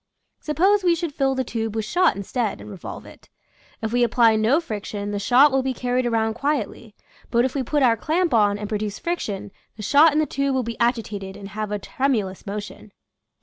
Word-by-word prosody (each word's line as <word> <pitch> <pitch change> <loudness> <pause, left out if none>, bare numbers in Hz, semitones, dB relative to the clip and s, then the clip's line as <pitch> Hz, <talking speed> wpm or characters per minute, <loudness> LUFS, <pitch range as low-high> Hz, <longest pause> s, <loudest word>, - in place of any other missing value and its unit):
Sup 300 - -5
pose 395 +3 +4
we 350 -2 +4
should 335 -3 -4
fill 270 -1 +1
the 260 - 0
tube 225 -2 -4
with 220 -1 -1
shot 360 +10 +2
instead, 210 +2 -2
and 210 - -10
revolve 190 -4 -8
it. - - -16 0.5
If 220 +1 -2
we 245 - +2
apply 230 -1 +4
no 220 +8 +3
friction 205 -7 -5
the 205 - -2
shot 255 +7 +5
will 270 0 +2
be 260 -1 -2
carried 250 0 0
around 225 -1 +1
quietly, 265 -4 -3 0.3
but 235 +1 +3
if 260 - -2
we 275 - -1
put 285 +3 0
our 235 -3 +5
clamp 325 - 0
on 205 -3 +3
and 210 0 -5
produce 210 -1 -3
friction 210 - -4 0.3
the 210 - -7
shot 295 +8 +6
in 295 - -1
the 310 - +3
tube 275 -2 -1
will 260 - +1
be 230 0 -6
agitated 210 -5 -1
and 200 -1 -9
have 210 +1 -4
a 210 - 0
tremu 255 +1 0
lous 190 +1 -10
motion. 205 +1 -7
235 Hz, 220 wpm, -23 LUFS, 210-275 Hz, 0.5 s, shot